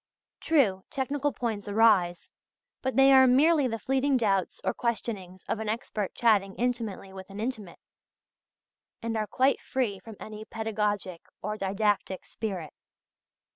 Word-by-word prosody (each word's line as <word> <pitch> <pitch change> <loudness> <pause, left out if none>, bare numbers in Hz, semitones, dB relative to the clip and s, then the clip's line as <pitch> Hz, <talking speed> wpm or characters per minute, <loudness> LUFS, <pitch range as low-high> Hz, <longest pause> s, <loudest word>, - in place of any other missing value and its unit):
True, 220 -13 +2
technical 285 +1 -1
points 220 -6 -3
arise, 200 -5 +3 0.5
but 260 0 -2
they 270 0 +7
are 265 0 +8
merely 285 +3 +4
the 225 -2 -2
fleeting 270 +3 +1
doubts 195 -6 0
or - - 0
questionings 205 -6 -3
of - - -1
an 220 -1 -3
expert 215 -3 -3
chatting 205 -5 +2
intimately 230 -6 -3
with 190 0 -10
an 195 +1 -8
intimate, 220 -6 -4 1.3
and 230 0 -2
are 215 -1 -1
quite 265 +4 +2
free 230 -7 -2
from 225 +1 -11
any 215 0 -8
pedagogic 210 -5 -2 0.2
or 210 +2 -2
didactic 200 -1 -1
spirit. 190 -8 -5
220 Hz, 135 wpm, -28 LUFS, 195-250 Hz, 1.3 s, are